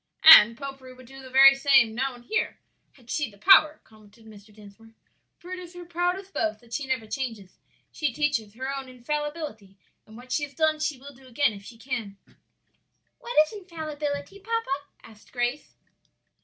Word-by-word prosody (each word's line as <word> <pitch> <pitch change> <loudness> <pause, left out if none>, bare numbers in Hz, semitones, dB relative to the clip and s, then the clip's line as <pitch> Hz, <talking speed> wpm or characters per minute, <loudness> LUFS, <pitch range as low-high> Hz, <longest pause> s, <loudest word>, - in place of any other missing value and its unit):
"And 230 -8 +9
popery 270 -2 -9
would 255 0 -16
do 270 +2 -13
the 260 - -12
very 270 +1 +8
same 270 -4 +3
now 260 +2 -2
and 240 0 -17
here, 450 - -2 0.4
had 245 -3 -14
she 295 -5 -1
the 200 - -19
power," 310 - +5
commented 215 +1 -21
Mr. 210 -1 -15
Dinsmore, 215 +2 -17 0.4
"for 355 - -13
it 370 - -5
is 355 -1 -12
her 355 0 -9
proudest 355 +3 -3
boast 215 -1 -2
that 235 0 -17
she 285 -3 -3
never 260 -4 -2
changes. 225 -5 -6 0.3
She 300 -4 -2
teaches 230 -6 -2
her 265 +3 -4
own 270 -1 -7
infallibility; 275 - -6 0.3
and 220 +1 -14
what 250 +1 -14
she 295 - 0
has 285 -1 -6
done 315 0 +1
she 305 -2 -2
will 280 +2 -12
do 265 0 -19
again 255 -1 +1
if 200 -1 -12
she 230 +3 -13
can." 225 -5 -5 1.0
"What 480 - -7
is 310 - -13
infallibility, 310 -3 -6
papa?" 400 -10 -3 0.2
asked 215 -2 -17
Grace. 245 +3 -3
265 Hz, 180 wpm, -25 LUFS, 230-300 Hz, 1.0 s, And